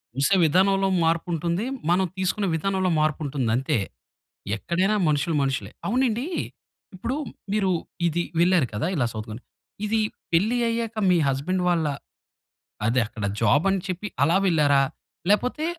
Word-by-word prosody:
చూసే 140 +8 +3
విధానంలో 195 +4 +3
మార్పుంటుంది, 170 +4 0 0.2
మనం 185 +2 +3
తీసుకున్న 190 +2 0
విధానంలో 190 +2 0
మార్పుంటుంది 145 -5 0
అంతే. 130 -2 0 0.8
ఎక్కడైనా 185 - 0
మనుషులు 150 +2 +1
మనుషులే. 130 -7 -2 0.2
అవునండీ 245 +3 +1 0.7
ఇప్పుడు 240 +8 -3 0.4
మీరు 195 -3 +2 0.4
ఇది 170 +1 0 0.2
వెళ్లారు 175 -6 +4
కదా! 110 +11 -1
ఇలా 125 -5 +1
సౌత్‌కొరియా. 110 +2 -7 0.4
ఇది 220 +1 +1 0.3
పెళ్లి 215 +9 +3
అయ్యాక 230 -1 -2 0.2
మీ 175 - +4
హస్బండ్ 170 +8 0
వాళ్ళ, 165 -3 +1 1.0
అదే 125 +2 +2
అక్కడ 105 -3 -5 0.2
జాబ్ 145 +9 +3
అని 195 -2 0
చెప్పి 185 +3 -4 0.2
అలా 170 +4 +3
వెళ్లారా? 145 -5 +4 0.5
లేపోతే, 250 +8 +1
175 Hz, 125 wpm, -24 LUFS, 145-195 Hz, 1.0 s, వెళ్లారు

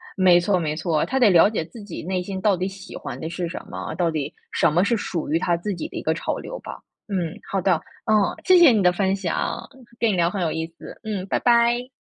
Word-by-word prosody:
没 180 -2 +5
错 185 +1 +1
没 155 -2 -2
错， 160 -2 0
他 265 +1 -1
得 230 -5 +6
了 180 +3 +6
解 210 -7 -2
自 225 +2 -12
己 205 - -7
内 185 +1 -1
心 190 0 -5
到 205 -3 +3
底 185 +2 -2
喜 195 0 -10
欢 - - -7
的 160 - -4
是 175 0 -3
什 - - -5
么， - - -5
到 170 -1 +1
底 150 -3 -3 0.2
什 - - +3
么 175 +4 +3
是 230 +3 +2
属 170 -7 -4
于 160 - +3
他 175 -1 +1
自 200 +3 -3
己 165 - -5
的 - - -8
一 - - -3
个 160 - +1
潮 - - -3
流 - - -7
吧。 - - -9 0.3
嗯， 180 -5 -2
好 195 - +1
的， 185 0 +3 0.3
嗯， 220 - +3 0.3
谢 370 -1 +7
谢 335 -7 +8
你 210 -4 +2
的 180 - +5
分 195 +1 +1
享， 185 -4 -3 0.3
跟 230 -2 +3
你 - - 0
聊 170 -1 +2
很 195 0 -3
有 165 - 0
意 160 0 -3
思， - - -11
嗯， 205 -4 -3
拜 - - 0
拜。 240 +1 +3
185 Hz, 280 characters per minute, -23 LUFS, 170-210 Hz, 0.3 s, 谢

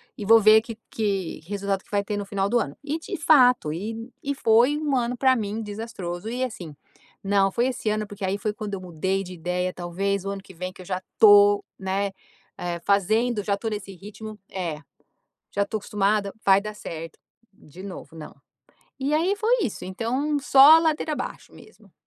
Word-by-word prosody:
e 210 - -7
vou 225 +2 +7
ver 215 +1 +7
que 230 -1 -9
que 200 -5 -2
o 170 - -21
resultado 200 -1 -2
que - - -27
vai 200 0 +1
ter 210 0 -3
no 205 - -4
final 195 -1 -1
do 240 +3 +2
ano. 140 -9 -4
E 300 +2 -3
de - - -6
fato, 250 - +4
e 225 +7 -6
e 280 0 -2
foi 240 +5 +4
um 295 -3 -1
ano 245 0 -1
para 260 0 +4
mim 220 0 -3
desastroso 205 -3 -6
e 250 +2 -2
assim, 175 - -6 0.5
não, 195 -1 +2
foi 240 +4 +1
esse 245 -4 -2
ano 215 0 -1
porque 205 0 -9
aí 190 +2 0
foi 210 +1 -2
quando 210 -2 -5
eu 190 - -6
mudei 190 +3 -2
de 185 - -9
ideia 180 +1 -2
talvez 190 +3 -2
o 195 - -4
ano 200 -1 -5
que 190 - -14
vem 185 +2 -5
que 185 - -14
eu - - -16
já 185 0 -2
estou, 205 -1 +6
né, 195 +1 -1 0.5
eh, 175 -1 -3
fazendo, 210 +3 +2
já 200 -1 0
estou 220 +2 -4
nesse 200 -2 -5
ritmo, 210 +3 -10
é, 170 -5 -4 0.7
já 200 - 0
estou 215 +2 -2
acostumada, 205 0 0
vai 195 0 +6
dar 210 +1 -6
certo, 165 -4 -8 0.3
de 185 -2 -15
novo 190 -4 -9
não. 155 - -10 0.6
E 275 +3 0
aí 355 +6 +1
foi 450 +4 +2
isso 220 - -3
então 245 +10 -2
só 275 +3 +8
a - - +6
ladeira 315 -1 0
abaixo - - -6
mesmo. - - -18
205 Hz, 205 wpm, -24 LUFS, 190-235 Hz, 0.7 s, só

